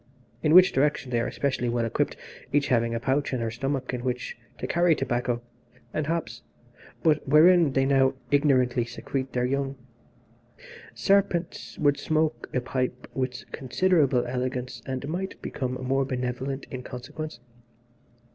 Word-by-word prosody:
In 155 +2 +4
this 185 0 +9
direction 135 -2 +1
they 120 - +2
are 115 - 0
especially 130 -3 -1
well 120 0 0
equipped, 115 - -1 0.3
each 145 -1 +2
having 115 -1 +2
a - - -1
pouch 135 +3 0
in 130 - 0
her 115 -1 -2
stomach 135 +3 -2
in 120 -1 -3
which 125 -1 -3 0.2
to - - -4
carry 170 -1 +3
tobacco 120 -3 -1 0.5
and 155 -1 -1
hops, 165 0 -2 0.6
but 155 -3 +2
wherein 160 +1 +6
they 135 0 +3
now 135 -1 +3 0.2
ignorantly 130 -4 +3
secrete 130 +3 -4
their 125 0 +1
young. 135 +1 -1 1.2
Serpents 195 -4 +1
would 145 -1 +2
smoke 155 +1 0
a 125 - 0
pipe 125 0 -3
with 125 -3 -3
considerable 140 -2 +2
elegance, 125 -1 -3
and 130 +1 -3
might 185 +5 -4
become 130 -2 -3
more 130 +2 0
benevolent 130 +1 -3
in 130 - -5
consequence. 125 +2 -7
130 Hz, 145 wpm, -26 LUFS, 125-150 Hz, 1.2 s, this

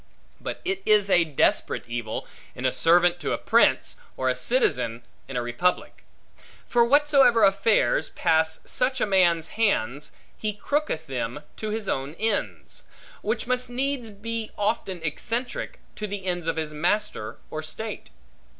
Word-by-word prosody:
But - - -6
it 375 0 -1
is 210 -2 +3
a 175 - +6
desperate 145 -5 +1
evil, 120 -2 -4 0.3
in 125 - -5
a 130 - +3
servant 175 +1 +4
to - - -2
a - - 0
prince, - - +3 0.2
or - - +1
a - - +1
citizen 260 - +1 0.2
in 135 - -5
a 120 - -1
republic. 120 +10 -1 0.6
For 240 -1 +3
whatsoever 275 -3 +5
affairs 195 - +3
pass 160 0 +1
such 260 +1 0
a - - +2
man's 175 -5 +3
hands, 145 - +1 0.2
he 215 -1 -3
crooketh 210 - -2
them 130 0 -4
to 215 - -4
his 215 -1 -3
own 135 +3 -2
ends; 220 0 -3 0.4
which 220 +2 -2
must 250 0 -1
needs 260 -1 -2
be 220 +2 -5
often 200 -4 -1
eccentric 230 - -3 0.2
to 210 - -3
the 200 -1 -5
ends 175 -2 -2
of 165 - +1
his 155 -1 -3
master, 175 - -1
or 155 - -3
state. 210 +7 -5
195 Hz, 150 wpm, -25 LUFS, 155-230 Hz, 0.6 s, a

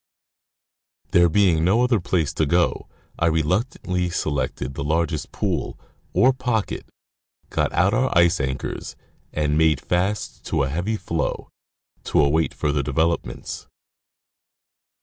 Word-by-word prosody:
There 85 0 +5
being 85 -3 +3
no 105 +8 +3
other 125 -3 +3
place 85 -4 0
to 80 - 0
go, 85 +2 +1 0.3
I 85 - +3
reluctantly 90 - 0
selected 70 -5 -2
the 70 - -4
largest 80 0 -1
pool, - - -2 0.3
or 130 +2 +4
pocket, 120 -4 -2 0.6
got - - 0
out - - +2
our - - +2
ice 85 +1 +4
anchors, 65 -1 -4 0.4
and 75 0 0
made 80 -3 +4
fast 95 +7 -2
to - - 0
a 70 - -1
heavy 90 +9 -1
floe, 85 -5 -3 0.6
to - - +1
await 75 +2 +2
further 75 -1 0
developments. 75 -2 -2
85 Hz, 125 wpm, -23 LUFS, 75-90 Hz, 0.6 s, There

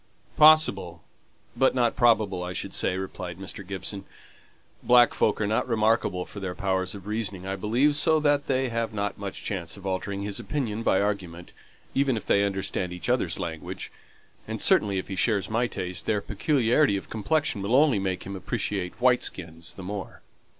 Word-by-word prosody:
"Possible, 100 - +5 0.5
but 135 -1 +3
not 120 -2 +2
probable, 110 -6 +3
I 90 0 -4
should 95 +1 -4
say," 90 - 0
replied 90 -2 -6
Mr. 95 +1 -7
Gibson. 100 +1 -5 0.8
"Black 120 -1 +5
folk 105 - +1
are 105 - +1
not 110 +4 0
remarkable 110 -5 +1
for 100 - -9
their 95 -2 -4
powers 95 -1 -1
of 100 -2 -10
reasoning, 105 -3 -3
I 95 0 -2
believe, 120 +9 +2
so 160 +1 +4
that 145 -1 +1
they 130 -1 +1
haven't 110 -4 -2
much 100 -1 -6
chance 90 -4 -4
of 100 - -12
altering 100 +1 -3
his 100 -1 -3
opinion 115 -7 -3
by 95 - +2
argument, 90 -4 -3 0.4
even 135 -3 +1
if 110 - -6
they 100 - +3
understood 95 -2 -2
each 90 -2 -5
other's - - +1
language; 80 -2 -6 0.6
and - - -4
certainly 100 -2 +3
if 95 - -3
he 95 - -5
shares 100 0 +1
my 120 +2 +1
taste, 90 -5 -5
their 105 -2 +2
peculiarity 125 - +2
of - - -7
complexion 110 0 0
will 100 +5 +1
only 140 -6 +4
make 95 -1 -2
him 100 +1 -6
appreciate 95 -2 -3
white 125 0 +4
skins 85 -2 -4
the 95 - -9
more." 100 0 -7
100 Hz, 180 wpm, -26 LUFS, 95-120 Hz, 0.8 s, Possible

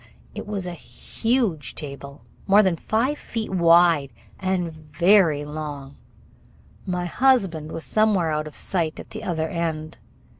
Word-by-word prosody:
It - - -7
was 200 -3 -3
a 180 - -4
huge 175 - -2
table, 140 -1 -9 0.2
more 205 +2 +6
than 185 -3 +2
five 240 - -1
feet 225 -3 -5
wide 170 -5 +4 0.3
and 185 -3 -1
very 155 0 +3
long. 145 -2 -7 0.9
My 180 -1 -1
husband 185 - +1
was 165 - -5
somewhere 205 -7 +2
out 155 0 -2
of 150 - -11
sight 165 -4 -1
at - - -10
the 220 - -6
other 160 -5 -1
end. 160 -2 -4
Mr. - - -31
170 Hz, 145 wpm, -23 LUFS, 155-195 Hz, 0.9 s, more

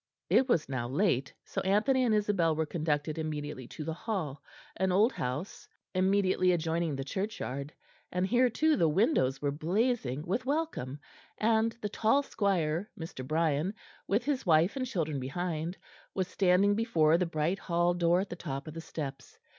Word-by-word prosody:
It 260 - +4
was 165 -10 +2
now 130 -3 -2
late, 140 -3 +1
so - - -3
Anthony 215 +7 +3
and 225 -3 +3
Isabel 200 -6 +2
were 160 0 0
conducted 155 -1 -1
immediately 150 -4 -4
to 155 - -7
the 160 +1 -3
Hall, 165 - -4 0.4
an 190 0 +1
old 210 +7 +4
house 130 +10 -4 0.3
immediately 185 -1 +3
adjoining 165 -2 0
the 135 - -3
churchyard; 140 - -4 0.4
and 180 +1 0
here, 245 +5 +3
too, 310 +6 +2
the 165 - +3
windows 150 - +2
were 145 - +1
blazing 165 - 0
with 195 +7 -1
welcome, 280 - -2 0.4
and 225 +1 +2
the 210 - -2
tall 225 +7 +2
squire, 185 - 0
Mr. 160 -5 -6
Brian, 155 +5 0 0.3
with 205 +5 +1
his 275 -2 0
wife 165 - +4
and 260 -1 -2
children 155 - -2
behind, 165 +5 -3 0.4
was 185 -2 0
standing 190 +2 +3
before 170 -8 +3
the 180 - +1
bright 165 +4 -1
hall 175 0 +1
door 175 +1 +3
at 195 - -5
the - - -3
top 140 -4 -5
of 155 - -6
the 165 - -6
steps. 135 -5 -7
175 Hz, 170 wpm, -30 LUFS, 155-205 Hz, 0.4 s, It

